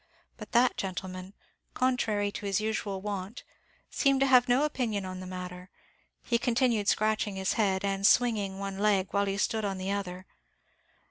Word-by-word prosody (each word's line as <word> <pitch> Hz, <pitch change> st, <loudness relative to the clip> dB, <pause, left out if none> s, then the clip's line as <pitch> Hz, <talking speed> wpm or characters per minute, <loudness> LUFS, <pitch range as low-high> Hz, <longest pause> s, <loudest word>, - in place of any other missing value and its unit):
But -, -, -11 dB
that 245 Hz, +1 st, +4 dB
gentleman, 185 Hz, 0 st, -5 dB, 0.4 s
contrary 220 Hz, -5 st, +1 dB
to 200 Hz, -, -6 dB
his 195 Hz, 0 st, +1 dB
usual 215 Hz, -3 st, -2 dB
wont, 200 Hz, +1 st, -5 dB, 0.5 s
seemed 275 Hz, -2 st, +2 dB
to -, -, +5 dB
have 255 Hz, -1 st, +5 dB
no 250 Hz, +4 st, +4 dB
opinion 235 Hz, -9 st, -1 dB
on 185 Hz, 0 st, -6 dB
the 185 Hz, -, -7 dB
matter; 180 Hz, 0 st, -7 dB, 0.5 s
he 235 Hz, -1 st, +1 dB
continued 235 Hz, -4 st, +1 dB
scratching 215 Hz, -2 st, +1 dB
his 190 Hz, 0 st, 0 dB
head, 195 Hz, -3 st, +1 dB
and 195 Hz, 0 st, +2 dB
swinging 210 Hz, -6 st, +2 dB
one 195 Hz, 0 st, -5 dB
leg, 200 Hz, -2 st, +2 dB
while 200 Hz, 0 st, +1 dB
he 195 Hz, 0 st, -1 dB
stood 220 Hz, +1 st, 0 dB
on 195 Hz, -2 st, -2 dB
the 190 Hz, +1 st, -3 dB
other. 185 Hz, -2 st, -4 dB
200 Hz, 170 wpm, -29 LUFS, 190-230 Hz, 0.5 s, to